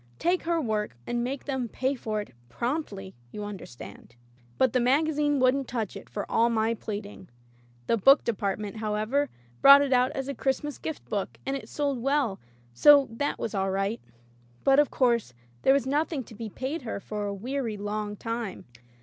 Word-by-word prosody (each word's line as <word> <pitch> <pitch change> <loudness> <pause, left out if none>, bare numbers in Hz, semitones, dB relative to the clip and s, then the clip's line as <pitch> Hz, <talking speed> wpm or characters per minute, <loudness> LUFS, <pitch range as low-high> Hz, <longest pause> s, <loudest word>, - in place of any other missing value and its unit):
Take 350 +2 +1
her 335 0 +1
work, 215 - -2
and 240 0 -1
make 260 +2 -4
them 265 -4 -2
pay 260 +4 -1
for 215 -5 -3
it 205 - -11 0.2
promptly 210 - -3
— 120 - -31
^you 210 - -5
understand." 130 -11 -10 0.4
But 260 -3 +3
the 255 - +3
magazine 290 +3 +2
wouldn't 255 +1 +2
touch 225 -5 -3
it - - -10
for 205 - -4
all 230 +1 +3
my 225 0 +1
pleading. 205 -4 -7 0.6
The 230 - +2
book 270 +8 +6
department, 205 -1 -2
how 215 -1 -2
ever, 260 +7 0 0.3
brought 280 +1 +9
it 275 -2 +1
out 250 0 +4
as 270 0 -3
a 280 - -2
Christmas 275 +3 -2
gift 315 - -6
book, 200 -2 -3
and 270 - -1
it 275 - -7
sold 280 -4 -1
well, 275 -6 +1 0.3
so 285 - +7
that 285 +6 -2
was 225 - -4
all 195 -1 0
right. 195 +4 -1 0.6
But, 275 +1 +5
of 295 - +4
course, 235 - +1 0.3
there - - +5
was 280 -1 +2
nothing 290 +1 0
to 230 - -14
be 220 0 -6
paid 265 +9 -4
her 225 -5 -4
for 210 0 -4
a - - -2
weary 235 +1 -3
long 205 0 -3
time. 230 -2 -4
240 Hz, 190 wpm, -27 LUFS, 210-275 Hz, 0.6 s, brought